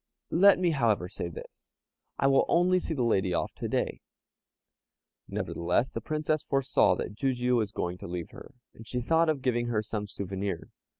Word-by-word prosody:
Let 195 +4 +6
me, 180 -2 +2
however, 115 - +1
say 85 - -5
this, 85 - -12 0.4
I - - 0
will 135 0 +5
only 180 +2 +3
see 165 - -4
the 130 - 0
lady 95 -6 +1
off - - -2
to - - -3
day." - - -1 1.3
Nevertheless, 90 +9 -1
the - - -4
Princess 155 0 -1
foresaw 135 -1 +2
that - - -4
Jijiu 125 0 +1
was 110 -3 0
going 90 -3 -3
to - - -7
leave 85 -1 -5
her, - - -13 0.2
and 115 - -13
she 125 - -2
thought 160 +6 +2
of 145 -4 -1
giving 120 -2 +1
her 110 -3 0
some 105 -1 -4
souvenir. 95 -2 -4
120 Hz, 180 wpm, -29 LUFS, 100-150 Hz, 1.3 s, Let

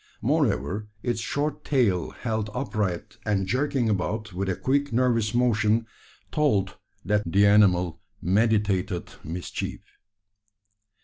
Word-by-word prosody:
Moreover, 105 +3 0 0.2
its 120 -2 -1
short 145 +5 -2
tail, 105 - +1
held 110 -3 -3
upright 105 -8 -2
and 100 -2 0
jerking 130 +3 0
about 105 0 -1
with 95 +2 -2
a 95 - 0
quick 140 +5 0
nervous 115 -2 +1
motion, 115 -2 +2 0.5
told 105 -11 +1 0.3
that 105 +1 +2
the 100 +3 +5
animal 95 -5 +4 0.2
meditated 100 -2 +1
mischief. 85 +3 -5
105 Hz, 110 wpm, -26 LUFS, 95-120 Hz, 0.5 s, the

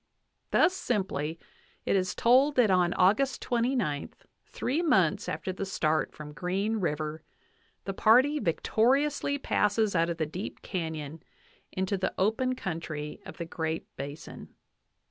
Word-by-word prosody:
Thus 370 - +4
simply 165 - -2 0.5
is 185 -2 +1
it - - -24
told 265 +5 +4
that 235 -6 +4
on 180 -2 +3
August 215 +9 +3
29, 235 - 0 0.4
three 285 +7 -1
months 190 - +2
after 165 +5 -3
the 195 - -4
start 160 -5 0
from 150 -1 -10
Green 195 +7 -1
River, 155 -4 -2 0.6
the 195 - -3
party 255 +9 +4
victoriously 275 - +1
passes 210 -5 +1
out 165 0 +2
of 170 - -3
the 160 - 0
deep 180 +7 -7
canyon 160 -4 -4 0.5
into 190 +1 -1
the 190 - -2
open 225 +6 +1
coun 170 -9 -3
try 150 -2 -6
of - - -10
the 170 - -4
Great 160 -1 -4
Basin. 145 +4 -8
190 Hz, 140 wpm, -29 LUFS, 160-235 Hz, 0.6 s, Thus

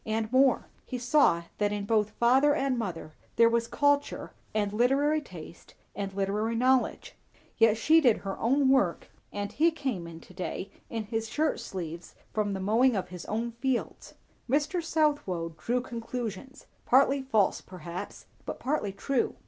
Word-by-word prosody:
And 220 0 -2
more; 260 0 +4 0.2
he 255 - -5
saw 245 - +3 0.2
that 205 -1 +1
in 205 -1 -3
both 215 -1 +2
father 265 +6 +3
and 270 -3 0
mother 165 -7 -5 0.2
there 230 - +6
was 230 0 0
culture 285 +1 0 0.2
and 205 -1 -1
literary 275 +7 +2
taste 170 - -12 0.2
and 200 0 -3
literary 210 +3 -1
knowledge. 255 +2 +1 0.5
Yet 225 -1 +5
she 315 +8 +5
did 245 -7 +4
her 195 -1 -5
own 265 +3 +3
work, 230 -11 +2 0.2
and 205 0 -4
he 325 +3 +3
came 260 - -4
in 165 -1 -9
to - - -16
day 185 +1 -5 0.2
in 225 -1 -3
his 225 +1 -3
shirt 305 +5 0
sleeves 170 -2 -7 0.2
from 210 -2 0
the 190 - -3
mowing 225 +6 +3
of 185 -2 -2
his 180 -1 -8
own 230 +3 -2
fields. 240 +1 -3 0.3
Mr. 300 +6 +1
Southwode 290 - 0
drew 245 +1 -1
conclusions, 240 +1 -6 0.2
partly 275 +2 +4
false 220 -7 +1
perhaps, 175 -1 -8 0.2
but - - -6
partly 260 -7 -1
true. 245 +6 -1
230 Hz, 160 wpm, -28 LUFS, 200-265 Hz, 0.5 s, there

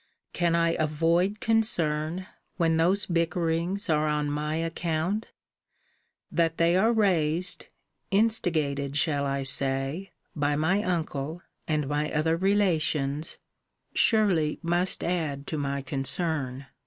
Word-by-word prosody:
Can 170 -1 +1
I 165 0 +3
avoid 165 +6 +1
concern, 175 -7 +1 0.3
when 165 -2 +2
those 185 +5 +2
bickerings 170 +2 -1
are 155 -1 +2
on 150 -1 0
my 150 +1 -2
account? 165 +5 -2 1.0
That 165 -1 +1
they 170 +1 +3
are 215 +5 +4
raised 180 -6 +1 0.4
(instigated 155 -10 +1
shall 145 -2 +1
I 140 0 -1
say?) 135 +6 -1 0.3
by 145 -1 +1
my 170 +7 +1
uncle, 165 -3 -3 0.2
and 150 -3 0
my 150 +1 -1
other 160 +1 +1
relations, 160 -6 +1 0.6
surely 190 -9 +3
must 175 +2 +1
add 155 -6 -2
to 155 - -4
my 140 -1 -2
concern. 135 0 -1
160 Hz, 115 wpm, -27 LUFS, 150-180 Hz, 1.0 s, are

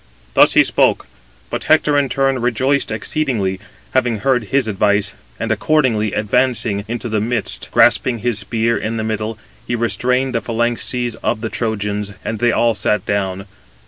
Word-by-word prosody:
Thus - - +5
he - - +7
spoke. - - +2 0.5
But - - -3
Hector 155 -2 +3
in 140 -2 +2
turn 135 -1 +1
rejoiced 130 +4 +1
exceedingly, 110 -4 -1 0.3
having 115 -4 0
heard 125 -2 +1
his 130 +2 +1
advice, 105 0 +1 0.3
and - - -2
accordingly 125 -9 +1
advancing 110 -1 +1
into 120 +1 -3
the 110 -2 -1
midst, 115 0 -3
grasping 125 -2 +4
his 115 -1 -1
spear 115 +2 0
in 115 +1 -3
the 110 - -2
middle, 110 0 -3 0.3
he 120 - -1
restrained 125 +3 0
the 115 - 0
phalanxes 120 +1 -1
of 110 - -2
the 110 - -3
Trojans; 105 -3 -3
and 110 -1 -3
they 120 0 +3
all 115 0 +2
sat 105 -1 0
down. 95 -1 -2
115 Hz, 160 wpm, -18 LUFS, 105-125 Hz, 0.5 s, he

